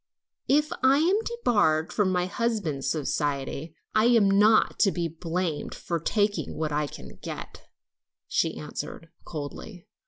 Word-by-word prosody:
"If 300 +2 +3
I 260 +1 +5
am 355 +7 +3
debarred 205 - +1
from 200 -3 +2
my 180 -1 +1
husband's 195 - -1
society, 145 0 -2 0.2
I'm 215 -2 +5
not 210 +2 +4
to 195 - +4
be 175 -2 -1
blamed 165 -1 -3
for 170 -1 -3
taking 205 +5 0
what 155 -1 -1
I 150 0 0
can - - -11
get," - - -8 0.6
she - - 0
answered 165 - -7 0.2
coldly. 165 +5 -7
180 Hz, 130 wpm, -27 LUFS, 155-225 Hz, 0.6 s, I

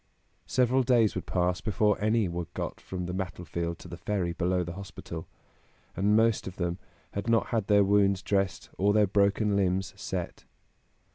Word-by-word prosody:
Several 130 +1 +3
days 120 -4 +3
would - - -5
pass 90 -1 0
before 105 0 +1
any 110 -1 +2
were 85 -1 -4
got - - -4
from 90 -1 -5
the 90 - -4
battlefield 85 -2 -4
to - - -12
the - - -8
ferry 95 -5 -1
below 90 +1 0
the 85 0 -6
hospital, 85 -3 -8 0.7
and 100 +3 +3
most 115 -2 +3
of 95 - -6
them 85 0 -2 0.3
had 100 +3 -3
not 115 -1 +2
had 110 -4 0
their 100 -1 +5
wounds 100 -1 +3
dressed 95 -2 -1
or 100 +2 +3
their 105 0 +5
broken 100 +1 +2
limbs 95 0 0
set. 95 -3 -5
100 Hz, 170 wpm, -28 LUFS, 90-105 Hz, 0.7 s, their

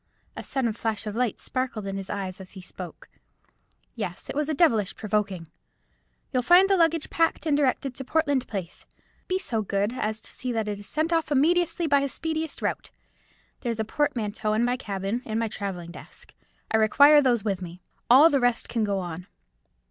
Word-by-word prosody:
A - - -5
sudden 255 -5 -1
flash 220 -1 -3
of 210 -1 -4
light 245 -3 0
sparkled 255 -5 -3
in 195 0 -4
his 195 -1 -6
eyes 190 -2 -4
as 185 - -11
he 190 - -9
spoke. 180 -1 -10 0.9
"Yes, - - -5
it - - -8
was 295 0 0
devilish 270 - +2
provoking. 200 -5 -2 0.9
You'll 255 - +2
find 355 +8 +6
the 390 - +3
luggage 330 -3 +2
packed, 330 0 +1
and 300 -3 +2
directed 275 -2 +1
to 265 - -6
Portland 285 -2 0
Place; 185 -5 -6 0.4
be 370 - +1
so 235 - -2
good 200 +2 -1
as 215 -3 -2
to - - -9
see 250 -1 -3
that 220 -2 -1
it 205 -1 -3
is 205 - -7
sent 315 +2 0
off 325 -2 0
immediately 335 +4 +2
by 285 -2 +4
the 280 0 -1
speediest 320 +2 -4
route. - - -2 0.7
There 240 - -2
is 225 - -5
a 220 - 0
portmanteau 220 -5 -1
in 225 +2 +2
my 245 +1 +1
cabin, 200 -1 -3
and 220 -1 -3
my 230 - 0
travelling 190 -5 -5
desk. - - -13 0.4
I 220 - +4
require 285 +7 +6
those 240 -6 +2
with 195 -3 -1
me. 175 0 -8 0.3
All 280 +7 +8
the 280 - +3
rest 245 -1 +1
can 230 -2 0
go 200 -2 0
on." 180 0 -5
235 Hz, 195 wpm, -26 LUFS, 205-290 Hz, 0.9 s, All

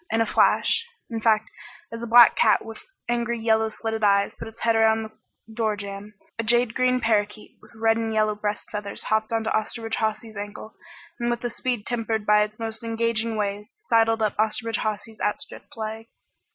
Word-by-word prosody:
In 225 - +1
a 225 - +3
flash 460 - +2 0.2
in 225 -1 -3
fact, 220 -1 +2 0.4
as 230 0 -6
a 235 - -4
black 235 0 +8
cat - - +3
with 225 -1 -9 0.2
angry 235 0 -1
yellow 220 0 +2
slitted 220 0 -4
eyes 200 -1 +3
put - - -8
its 225 +1 -13
head 230 -1 +2
around 220 0 +3
the 220 - -8 0.4
door 220 -1 0
jamb 200 +1 -8 0.2
a - - 0
jade 240 0 +2
green 255 0 +2
parakeet 210 -2 -1
with - - -19
red 225 0 +2
and 225 -1 -2
yellow 215 -1 +2
breast 210 0 -4
feathers 205 -1 -5
hopped 220 0 0
onto 225 -1 0
Osterbridge 225 +1 -2
Hawsey's 220 0 -2
ankle, 205 +2 -7 0.5
and 240 0 0
with 240 0 -2
a 240 - -2
speed 245 -2 -2
tempered 225 -3 -2
by 210 0 +5
its 210 0 -2
most 225 0 -5
engaging 230 0 -1
ways, 210 +1 -3
sidled 225 - +2
up 210 - 0
Osterbridge 220 +1 0
Hawsey's 215 +1 -4
outstretched 210 +2 -4
leg. 220 +1 -5
220 Hz, 190 wpm, -24 LUFS, 215-230 Hz, 0.5 s, black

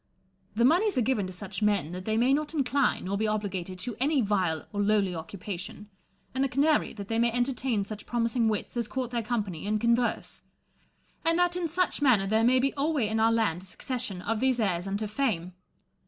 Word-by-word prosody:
The 235 +2 +3
moneys 370 - +3
are 250 - +3
given 215 -5 0
to - - -7
such 190 +3 -5
men, 205 -7 +1
that 185 +1 -6
they 220 0 0
may 250 +4 +4
not 300 +2 -1
incline 275 -5 +1
nor 200 +2 -2
be 220 - +1
obligated 195 -4 -3
to 230 +5 -5
any 285 +2 +2
vile 190 -8 0
or 205 - -1
lowly 205 -2 +2
occupation; 185 +4 -7 0.4
and 260 +1 0
the 275 - +1
canary, 290 +4 +2
that 200 -3 -8
they 225 +1 0
may 235 0 +3
entertain 245 -3 0
such 210 0 -8
promising 235 -1 +1
wits 210 +2 -3
as 235 -2 -1
court 255 -1 -3
their 240 -1 0
company 205 -7 -3
and 215 0 +1
converse; 235 +2 0 0.8
and 330 0 +2
that 355 0 +2
in 355 -2 -1
such 345 -1 0
manner 245 -9 +4
there 220 +3 +2
may 250 +2 +5
be 270 +2 +1
alway 285 -4 0
in 220 0 0
our 225 +1 +4
land 215 -7 +1
a - - -12
succession 210 -1 -3
of 225 0 -1
these 260 -1 +2
heirs 185 -4 0
unto 200 +2 -2
fame. 210 -7 -1
225 Hz, 210 wpm, -28 LUFS, 200-260 Hz, 0.8 s, may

